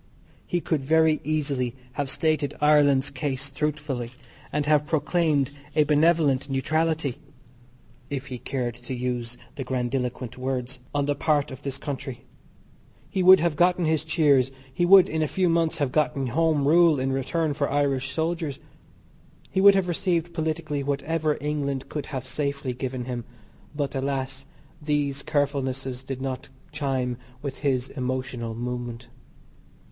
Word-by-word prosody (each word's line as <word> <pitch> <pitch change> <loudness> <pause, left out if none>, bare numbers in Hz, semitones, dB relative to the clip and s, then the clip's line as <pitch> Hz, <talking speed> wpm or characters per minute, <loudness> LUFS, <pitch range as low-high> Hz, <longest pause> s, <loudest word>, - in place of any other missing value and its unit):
He 175 - 0
could 160 -3 0
very 160 +2 +4
easily 140 -5 -1 0.2
have 140 +1 -3
stated 155 -1 +1
Ireland's 145 -2 +4
case 135 0 -3
truthfully, 145 -4 -2 0.4
and 150 0 0
have 150 -1 +3
proclaimed 150 -3 +1 0.2
a 155 - +5
benevolent 150 -2 +3
neutrality 155 0 0 0.9
(if 140 -2 -3
he 130 -3 -6
cared 125 -2 -2
to 120 +2 -7
use 120 -1 -3 0.2
the 135 - -2
grandiloquent 125 -1 -2
words) 130 0 -3 0.2
on 145 -1 +2
the 145 - +1
part 145 0 +1
of 130 +1 -8
this 140 -2 -4
country. 135 -3 -6 0.9
He 190 - 0
would 185 0 +9
have 170 -2 +1
gotten 175 +2 +3
his 160 -1 +1
cheers, 145 -5 +3 0.2
he 175 - +1
would 190 0 +8
in 160 0 -1
a 155 - +2
few 185 +4 +1
months 165 -1 +2
have 140 -3 0
gotten 140 -2 +1
Home 150 +2 +2
Rule 165 -2 +5
in 135 +1 0
return 145 +4 0
for 140 -1 -1
Irish 135 -2 +1
soldiers. 160 -2 -2 0.9
He 190 - +1
would 200 0 +8
have 190 -2 +1
received 175 -1 0
politically 155 -2 -2
whatever 150 +2 0
England 140 -2 -2
could 150 -2 -4
have 130 -3 -5
safely 140 -1 -2
given 130 0 -4
him. 120 -2 -4 0.5
But, 145 -2 -2
alas, 135 0 -3 0.3
these 145 -2 0
carefulnesses 135 -3 -1
did 130 0 -5
not 130 -1 -4 0.2
chime 135 -5 -1 0.3
with 140 -2 -5
his 135 -3 0
emotional 125 -3 -3
moment. 120 0 -5
140 Hz, 145 wpm, -25 LUFS, 130-155 Hz, 0.9 s, would